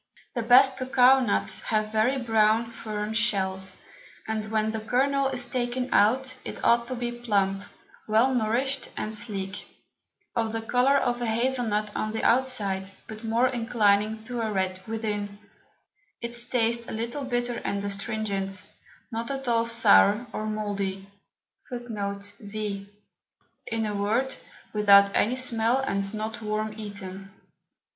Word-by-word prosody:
The 240 - -1
best 260 +3 +6
Cocao 255 0 +5
Nuts 205 - +1
have 215 -1 -1
very 220 +5 +2
brown 225 -1 +2
firm 215 -1 -4
Shells, 190 -4 0 0.5
and 220 -1 -2
when 220 0 +1
the 220 - -3
Kernel 270 +5 +1
is 260 -2 -1
taken 250 0 -2
out, 255 +5 +3
it - - -6
ought 235 0 +3
to 255 - -4
be 240 0 -3
plump, 200 -5 0 0.4
well 225 +5 +3
nourish'd, 250 +4 0
and 215 - -3
sleek; 205 -3 -5 0.7
of 225 -1 0
the 225 - -2
Colour 250 +4 +3
of 245 -2 0
a 240 - -1
Hazle 245 +2 +1
Nut 210 0 -1
on 215 0 -2
the 220 - -3
outside, 210 -7 +1 0.2
but 215 +1 -9
more 230 +3 +2
inclining 220 -3 +1
to 245 0 -4
a 220 -1 -1
Red 185 -2 -1
within; 210 -2 -3 0.8
its 235 0 -4
Taste 235 -1 +1
a - - -5
little 235 +5 -3
bitter 245 -2 -2
and 200 0 -2
astringent, 200 -2 -3 0.5
not 230 +1 -3
at 270 -1 -4
all 230 -1 +2
sour 225 -1 +5
or 215 - -3
mouldy[z]. 200 -2 -3 2.5
In 225 -1 -1
a 210 -1 -2
word, 225 +7 0 0.4
without 200 -1 +6
any 235 +4 +2
Smell, 235 -1 +2
and 200 -7 -1
not 220 +2 -4
worm 215 0 -2
eaten. 195 -3 -7
225 Hz, 140 wpm, -26 LUFS, 210-245 Hz, 2.5 s, best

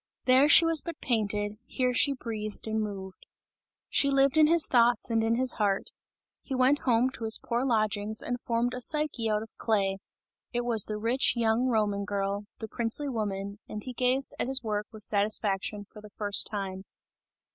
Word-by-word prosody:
There 265 +3 +5
she 330 - +7
was 330 -2 +3
but 335 -2 -7
painted, 210 -3 -2
here 250 -1 -1
she 280 +3 +3
breathed 215 -5 -6
and 220 0 -1
moved. 195 -3 -7 0.6
She 280 - +2
lived 275 0 +3
in 310 -1 +6
his 330 0 +5
thoughts 240 0 +2
and 225 -1 +1
in 225 +1 +1
his 255 +1 +2
heart; 200 -2 0 0.5
he 270 - -5
went 260 +3 +3
home 240 +2 +3
to 240 - -8
his 220 0 +3
poor 240 +1 -2
lodgings 215 -3 0
and 245 0 -4
formed 235 +1 -1
a 250 - -6
Psyche 295 -5 0
out 210 0 0
of 225 - -15
clay; 195 -3 0 0.5
it 240 - 0
was 225 -4 +3
the 215 - -4
rich, 230 +5 +1
young 230 +2 +1
Roman 210 -4 0
girl, 200 0 -3
the 220 - -6
princely 235 +6 0
woman, 200 -4 -4
and 210 0 -6
he 255 - -7
gazed 255 +2 0
at - - -1
his 265 -1 +1
work 210 -1 -3
with 215 -2 -12
satisfaction, 205 -1 -1
for 210 +1 -14
the 210 - -13
first 205 0 +2
time. 190 -2 -5
225 Hz, 190 wpm, -28 LUFS, 210-255 Hz, 0.6 s, she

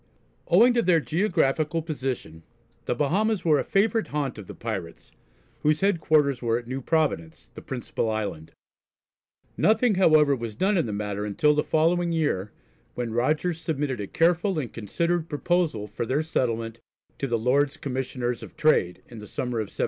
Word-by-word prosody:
Owing 230 +8 +6
to 240 - +3
their 175 -4 +4
geographical 160 -2 0
position, 130 - -4 0.4
the - - -1
Bahamas 195 - 0
were 155 -3 +4
a - - 0
favourite 220 +3 +1
haunt 140 -6 -3
of 100 - -10
the - - -9
pirates, 95 -8 -6 0.5
whose 150 +1 +1
headquarters 155 -8 +2
were 115 -1 +1
at 120 - -7
New 130 +3 -4
Providence, 140 - -1
the - - -10
principal 120 -3 -3
island. 105 -8 -4 1.1
Nothing 220 +1 +3
however 155 -6 +5
was 115 -4 -6
done 195 - +1
in 165 -9 +1
the - - -3
matter 105 0 -3
until 105 +9 +2
the 150 - +1
following 170 +2 +2
year, 145 - -1 0.4
when 120 -2 -3
Rogers 155 +7 0
submitted 140 -8 -2
a 100 - -4
careful 175 - +2
and 135 -6 -3
considered 170 - -1
proposal 155 -7 0
for 105 +2 -5
their 140 +6 +1
settlement 115 -7 -2 0.4
to 135 - -1
the 120 -2 0
Lords 135 +5 +1
Commissioners 125 -2 -3
of - - -11
Trade, 145 - +2
in 115 - -10
the 105 - -10
summer 125 +1 -3
of 110 - -1
1717. - - -19
145 Hz, 170 wpm, -25 LUFS, 115-165 Hz, 1.1 s, Owing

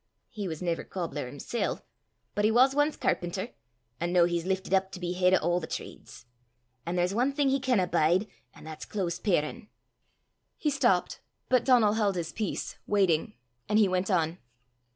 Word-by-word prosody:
"He 205 -4 -4
was 160 0 -5
never 170 -2 -1
cobbler 160 -7 -4
himsel', 145 - -3 0.5
but 205 - -1
he 215 - +5
was 255 +4 +5
ance 290 +2 +1
carpenter; 180 +6 -1 0.5
an' 170 +1 -1
noo 180 -1 +5
he's 170 0 0
liftit 190 0 -1
up 190 0 +2
to - - -6
be 175 0 -2
heid 180 +1 +4
o' 175 0 +1
a' - - +1
the 160 - -7
trades. 115 - -8 0.6
An' 170 - -1
there's 180 +1 +1
ae 245 +5 +2
thing 280 0 +1
he 270 +1 +2
canna 250 -8 +2
bide, 175 +3 +2 0.3
an' - - -14
that's 155 0 -8
close 185 -5 -3
parin'." 185 +1 -1 0.9
He 300 - 0
stopped. 240 -11 +1 0.3
But 250 -2 +3
Donal 235 -5 +5
held 210 -3 +1
his 165 -2 -3
peace, 215 +3 -4
waiting; 190 -6 +2 0.3
and 210 - +3
he 215 -2 +5
went 185 +1 -1
on. 170 -2 +1
190 Hz, 180 wpm, -28 LUFS, 175-220 Hz, 0.9 s, he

